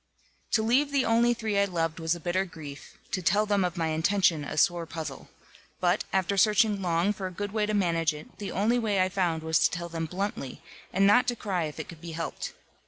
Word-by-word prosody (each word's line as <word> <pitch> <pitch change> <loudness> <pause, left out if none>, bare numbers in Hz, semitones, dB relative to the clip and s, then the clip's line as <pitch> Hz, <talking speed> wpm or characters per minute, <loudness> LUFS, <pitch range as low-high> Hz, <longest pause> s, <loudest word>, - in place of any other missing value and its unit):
To 220 - +3
leave 265 +6 +2
the 280 -2 +2
only 235 +1 +4
three 220 -3 -1
I 200 - +4
loved 165 -4 -2
was 165 +1 0
a - - -8
bitter 175 +3 0
grief, 155 -6 -10
to 185 - -1
tell 205 +5 +3
them 205 -2 +2
of 180 0 -2
my 165 -1 0
intention, 160 0 +2
a 145 - -6
sore 170 +1 +2
puzzle. 155 -4 -7 0.5
But, 180 +2 +1
after 190 +1 0
searching 210 0 +4
long 175 +2 +1
for 190 -2 -4
a - - -7
good 205 +2 -4
way 215 -1 0
to 215 - 0
manage 165 -5 +2
it, 150 0 -12
the 205 - -4
only 225 +5 +2
way 210 -4 0
I 185 0 +3
found 175 -4 0
was 160 0 +2
to - - +4
tell 170 0 -5
them 165 -1 -3
bluntly, 185 -6 -4 0.3
and 195 +2 +3
not 230 +5 +5
to 245 - +1
cry 190 -7 -2
if 150 - -7
it - - -5
could 165 -2 -11
be 170 -1 -7
helped. 165 0 -4
185 Hz, 235 wpm, -28 LUFS, 165-205 Hz, 0.5 s, not